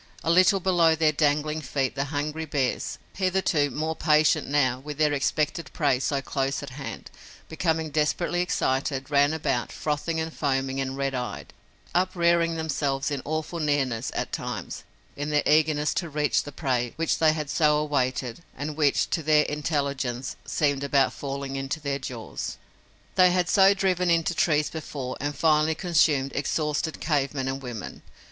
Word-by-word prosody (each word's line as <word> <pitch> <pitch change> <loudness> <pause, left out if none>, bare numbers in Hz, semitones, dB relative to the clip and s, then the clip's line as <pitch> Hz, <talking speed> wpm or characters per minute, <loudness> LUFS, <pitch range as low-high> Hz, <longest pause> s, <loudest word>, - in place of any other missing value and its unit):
A 165 - +2
little 185 +3 +5
below 175 -3 +3
their 160 -1 +3
dangling 150 +1 +1
feet 135 -2 -1
the 140 0 -2
hungry 150 +3 -3
bears, 140 -4 -1 0.2
hitherto 185 -6 +1
more 155 +4 -2
patient, 155 -1 +3
now, 130 -3 +1
with 145 +1 -7
their 150 -1 +3
expected 150 +3 -1
prey 140 -6 +2
so 135 0 -1
close 135 +1 -2
at 140 - -7
hand, 135 +2 -7 0.4
becoming 160 -1 -1
desperately 155 +4 0
excited, 135 -6 -1
ran 145 0 +4
about, 140 -6 -1
frothing 155 +2 -2
and 160 0 -3
foaming 135 -2 -1
and 135 0 -4
red 135 -1 -1
eyed, 125 -1 -5 0.4
uprearing 170 -2 +2
themselves 145 -3 -1
in 140 -2 -2
awful 155 +3 -3
nearness, 140 -7 0
at - - -2
times, - - -5 0.3
in 145 +1 -4
their 150 -1 +2
eagerness 150 -1 +3
to 170 - -2
reach 150 -1 +1
the 145 - -8
prey 125 -5 -1
which 165 0 0
they 155 -1 +5
had 155 -2 -3
so 150 0 +3
awaited 130 -3 -1 0.2
and 150 +1 -4
which, 145 -2 +2
to 165 - 0
their 155 0 +4
intelligence, 140 -4 -2
seemed 140 -2 0
about 140 -1 +2
falling 140 -1 -5
into 135 +3 -3
their 140 -2 -2
jaws. 125 -4 -6 0.6
They 185 -1 +6
had 180 -1 +1
so 195 +2 +5
driven 185 -2 +1
into 170 +1 +2
trees 150 -3 +1
before, 140 -5 -5
and 145 +1 -2
finally 155 +1 +3
consumed 155 -6 +2
exhausted 150 +2 -1
cave 145 -1 0
men 135 -1 -2
and 135 +1 -3
women. 120 -6 -7
150 Hz, 165 wpm, -26 LUFS, 135-160 Hz, 0.6 s, They